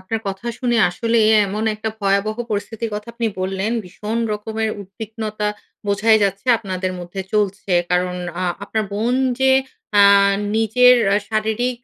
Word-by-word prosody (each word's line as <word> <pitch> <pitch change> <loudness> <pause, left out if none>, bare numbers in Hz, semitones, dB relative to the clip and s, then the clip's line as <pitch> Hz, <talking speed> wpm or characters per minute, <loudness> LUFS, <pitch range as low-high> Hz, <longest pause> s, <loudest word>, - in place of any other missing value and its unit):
আপনার 220 +4 -3
কথা 195 +4 -5
শুনে 240 -2 0
আসলেই 225 +4 +1 0.2
এমন 210 +3 -3
একটা 215 +1 -4
ভয়াবহ 200 +2 +1
পরিস্থিতির 215 +2 -3
কথা 210 +2 -6
আপনি 235 -1 -1
বললেন। 190 +4 -1
ভীষণ 210 +5 -4
রকমের 220 +1 -2
উদ্বিগ্নতা 215 +1 -5 0.4
বোঝাই 215 +2 +4
যাচ্ছে 195 +4 -1
আপনাদের 185 -3 -3
মধ্যে 175 +2 -6
চলছে। 200 -2 0 0.2
কারণ 180 0 +1 0.2
আ - - -1 0.2
আপনার 220 +1 -2
বোন 230 +5 0 0.3
যে 265 - +4 0.5
আ - - +8 0.5
নিজের 250 +3 +5 0.3
শারীরিক 220 +3 -1
215 Hz, 135 wpm, -20 LUFS, 195-225 Hz, 0.5 s, আ